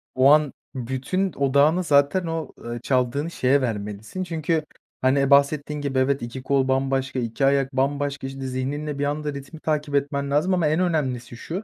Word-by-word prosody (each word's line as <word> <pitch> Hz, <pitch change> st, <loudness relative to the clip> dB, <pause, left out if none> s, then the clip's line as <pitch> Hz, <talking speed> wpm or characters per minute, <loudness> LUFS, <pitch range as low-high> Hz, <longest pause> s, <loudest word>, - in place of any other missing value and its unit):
o 130 Hz, +2 st, +6 dB
an 150 Hz, -2 st, +4 dB, 0.2 s
bütün 130 Hz, +10 st, -2 dB
odağını 140 Hz, +6 st, +3 dB
zaten 145 Hz, +4 st, +3 dB
o, 165 Hz, -1 st, -3 dB
eee, 120 Hz, 0 st, -4 dB
çaldığını 130 Hz, +5 st, 0 dB
şeye 135 Hz, -2 st, +2 dB
vermelisin. 110 Hz, -, -4 dB
Çünkü 160 Hz, -2 st, -1 dB, 0.4 s
hani 135 Hz, +1 st, +3 dB
bahsettiğin 145 Hz, +1 st, +3 dB
gibi 135 Hz, -2 st, -1 dB
evet 135 Hz, +1 st, +1 dB
2 120 Hz, +2 st, -6 dB
kol 135 Hz, -1 st, +1 dB
bambaşka, 135 Hz, 0 st, 0 dB
2 120 Hz, +3 st, -1 dB
ayak 135 Hz, 0 st, +2 dB
bambaşka 140 Hz, +1 st, -1 dB
işte 135 Hz, 0 st, -8 dB
zihninle 140 Hz, +3 st, -3 dB
bir 145 Hz, -, +1 dB
anda 150 Hz, 0 st, -2 dB
ritmi 140 Hz, +3 st, -9 dB
takip 150 Hz, -2 st, -1 dB
etmen 140 Hz, 0 st, -1 dB
lazım 155 Hz, +6 st, +2 dB
ama 170 Hz, -4 st, +2 dB
en 155 Hz, +3 st, +1 dB
önemlisi 130 Hz, -9 st, -1 dB
şu, 180 Hz, -, -5 dB
140 Hz, 170 wpm, -24 LUFS, 130-150 Hz, 0.4 s, o